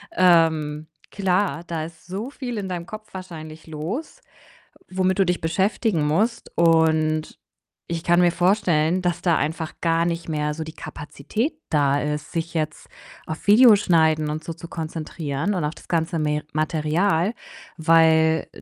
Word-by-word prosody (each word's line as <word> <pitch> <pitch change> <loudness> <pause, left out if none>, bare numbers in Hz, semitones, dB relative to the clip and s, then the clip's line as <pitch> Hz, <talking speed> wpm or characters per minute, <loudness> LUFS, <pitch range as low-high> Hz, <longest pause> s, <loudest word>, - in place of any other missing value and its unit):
Ähm, 160 -4 +3 0.2
klar, 185 -4 0
da 165 -2 -3
ist 160 0 -11
so 195 +7 -5
viel 250 -5 -6
in 195 -2 -4
deinem 175 -2 -4
Kopf 215 +1 -10
wahrscheinlich 160 -4 -9
los, 195 - -5 0.7
womit 185 0 0
du 195 - +5
dich 180 -1 -1
beschäftigen 190 +1 0
musst. 215 +10 0
Und 160 -2 +2 0.5
ich 165 -1 -4
kann 175 +1 +4
mir 175 -1 +4
vorstellen, 180 -2 +2
dass 175 -1 -1
da 170 -3 +2
einfach 160 +1 -2
gar 165 0 +2
nicht 170 0 -3
mehr 150 -1 -1
so 160 +1 -5
die 160 - -9
Kapazität 215 - -4 0.2
da 145 -2 +2
ist, 150 0 -3
sich 165 0 -3
jetzt 155 -2 -3 0.4
auf 160 - -6
Video 220 +2 +8
schneiden 160 -5 +2
und 155 +1 -3
so 165 - -5
zu 165 +1 -11
konzentrieren 160 +1 -3
und 175 -5 -1
auf 150 - -3
das - - -16
ganze 165 0 0
Me 150 -1 -1
Material. 160 +5 +1 0.4
Weil, 160 0 +4
äh, - - -13
165 Hz, 160 wpm, -23 LUFS, 155-185 Hz, 0.7 s, Video